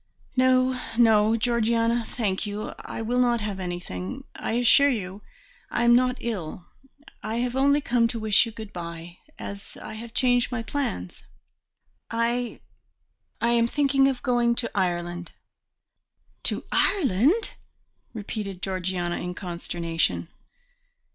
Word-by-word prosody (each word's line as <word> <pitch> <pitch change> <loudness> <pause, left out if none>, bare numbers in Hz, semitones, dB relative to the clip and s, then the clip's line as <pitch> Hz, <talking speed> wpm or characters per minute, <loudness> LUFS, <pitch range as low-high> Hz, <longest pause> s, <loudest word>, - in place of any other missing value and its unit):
"No, 255 0 +3 0.2
no, 220 -1 +5
Georgiana, 230 0 +1
thank 205 -3 -1
you. 205 +1 -4
I 225 - -6
will 245 +3 0
not 240 -1 +3
have 205 -2 -3
anything; 175 - -5
I - - -3
assure 245 +4 +5
you 200 -5 -3 0.5
I 240 - 0
am 240 0 +6
not 250 +1 +3
ill. 180 -7 -4 0.6
I 220 - -3
have 245 +1 -1
only 280 +2 +4
come 240 -3 +2
to 230 0 -3
wish 220 +1 +4
you - - -6
good 220 -2 -9
bye, 170 0 -7 0.2
as 200 0 -8
I 220 - -8
have 230 +2 -9
changed 245 -1 +3
my 235 -2 -2
plans; 205 - -3 0.9
I 235 +1 -1 0.8
I 235 - +3
am 235 -1 +3
thinking 275 0 +3
of 265 -2 -2
going 240 -2 +2
to 235 -1 -1
Ireland." 175 -2 -2 1.1
"To - - 0
Ireland!" 300 - +2 0.6
repeated 205 -3 -5
Georgiana 185 -2 -1
in 180 0 -4
consternation. 170 -2 -2
230 Hz, 130 wpm, -26 LUFS, 185-245 Hz, 1.1 s, am